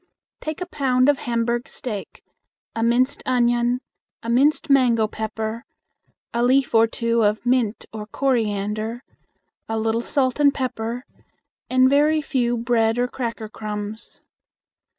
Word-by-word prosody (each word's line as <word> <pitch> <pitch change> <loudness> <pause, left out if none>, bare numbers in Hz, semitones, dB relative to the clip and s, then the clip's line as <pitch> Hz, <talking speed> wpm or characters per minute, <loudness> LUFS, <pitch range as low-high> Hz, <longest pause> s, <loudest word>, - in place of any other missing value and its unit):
Take 310 +2 -5
a - - -1
pound 265 -6 +2
of 290 - +2
Hamburg 235 0 -1
steak, 215 -6 -6 0.5
a 225 - -2
minced 250 +4 +2
onion, 240 0 +2 0.4
a 230 - -2
minced 290 +6 +3
mango 250 -6 +4
pepper, 220 +1 -4 0.7
a 235 - 0
leaf 260 +2 +3
or 225 0 +6
two 230 0 0
of 210 +3 +1
mint 245 -3 +1
or 210 -1 -6
coriander, 220 -2 -1 0.7
a 225 - -1
little 225 +1 0
salt 260 +1 0
and 285 -1 +6
pepper, 245 -2 -4 0.6
and 255 0 +5
very 295 +3 +4
few 245 -5 0
bread 230 -1 +1
or 245 0 +1
cracker 235 -3 -4
crumbs. 210 0 -7
240 Hz, 130 wpm, -22 LUFS, 225-255 Hz, 0.7 s, or